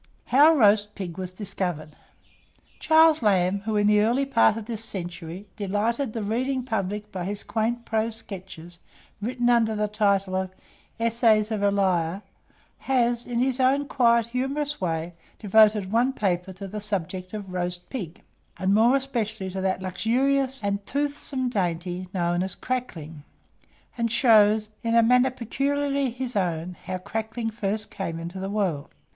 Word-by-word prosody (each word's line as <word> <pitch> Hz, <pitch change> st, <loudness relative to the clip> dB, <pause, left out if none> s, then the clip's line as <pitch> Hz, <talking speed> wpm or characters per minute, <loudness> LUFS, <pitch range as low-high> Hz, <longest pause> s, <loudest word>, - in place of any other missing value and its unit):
HOW 300 Hz, +5 st, +6 dB
ROAST 210 Hz, -3 st, +4 dB
PIG 180 Hz, -3 st, -6 dB
WAS 185 Hz, -1 st, -4 dB
DISCOVERED. 180 Hz, -6 st, -4 dB, 0.8 s
Charles 315 Hz, -1 st, +5 dB
Lamb, 195 Hz, -2 st, +2 dB
who, 220 Hz, -1 st, 0 dB
in 205 Hz, -, +2 dB
the 210 Hz, 0 st, +4 dB
early 240 Hz, +6 st, +2 dB
part 215 Hz, -, +3 dB
of 225 Hz, -, -6 dB
this 225 Hz, -1 st, -4 dB
century, 175 Hz, -2 st, -6 dB
delighted 220 Hz, +5 st, -1 dB
the 225 Hz, -, -3 dB
reading 255 Hz, +5 st, -1 dB
public 210 Hz, -3 st, -3 dB
by 185 Hz, -2 st, -4 dB
his 200 Hz, +2 st, -4 dB
quaint 235 Hz, +1 st, -2 dB
prose 220 Hz, 0 st, 0 dB
sketches, 180 Hz, -5 st, -8 dB, 0.4 s
written 245 Hz, +2 st, -1 dB
under 230 Hz, -2 st, +3 dB
the 210 Hz, 0 st, 0 dB
title 200 Hz, -3 st, +1 dB
of 190 Hz, 0 st, -3 dB, 0.4 s
"Essays 230 Hz, -2 st, +2 dB
of 215 Hz, -2 st, -1 dB
Elia," 190 Hz, -3 st, +1 dB, 0.6 s
has, 240 Hz, -2 st, 0 dB
in 240 Hz, -, -3 dB
his 255 Hz, +1 st, +1 dB
own 270 Hz, +2 st, +2 dB
quiet 235 Hz, -4 st, +3 dB
humorous 270 Hz, +4 st, -2 dB
way, 165 Hz, -1 st, -2 dB, 0.2 s
devoted 210 Hz, -2 st, +4 dB
one 245 Hz, +4 st, +2 dB
paper 190 Hz, -4 st, -1 dB
to 195 Hz, +1 st, -8 dB
the 210 Hz, +2 st, -6 dB
subject 185 Hz, -2 st, -3 dB
of 195 Hz, -3 st, -7 dB
Roast 175 Hz, 0 st, -3 dB
Pig, 185 Hz, -10 st, -6 dB, 0.3 s
and 190 Hz, +1 st, +1 dB
more 230 Hz, +5 st, +5 dB
especially 220 Hz, -8 st, -2 dB
to 190 Hz, +1 st, -4 dB
that 190 Hz, 0 st, -1 dB
luxurious 260 Hz, +7 st, 0 dB
and 200 Hz, 0 st, -1 dB
toothsome 285 Hz, -2 st, -2 dB
dainty 180 Hz, -4 st, -2 dB
known 175 Hz, -1 st, 0 dB
as 190 Hz, +1 st, -3 dB
"CRACKLING;" 165 Hz, -12 st, -5 dB, 0.8 s
and 230 Hz, -1 st, 0 dB
shows, 215 Hz, -3 st, +4 dB
in 230 Hz, 0 st, 0 dB
a 230 Hz, -, +6 dB
manner 250 Hz, +3 st, +4 dB
peculiarly 275 Hz, +3 st, -1 dB
his 250 Hz, 0 st, -5 dB
own, 175 Hz, -2 st, -1 dB
_how 185 Hz, -1 st, -4 dB
crackling 225 Hz, +2 st, -3 dB
first 215 Hz, 0 st, -2 dB
came 170 Hz, -4 st, -4 dB
into 170 Hz, +3 st, -6 dB
the 190 Hz, +1 st, -4 dB
world. 190 Hz, -9 st, -1 dB
210 Hz, 155 wpm, -25 LUFS, 185-240 Hz, 0.8 s, HOW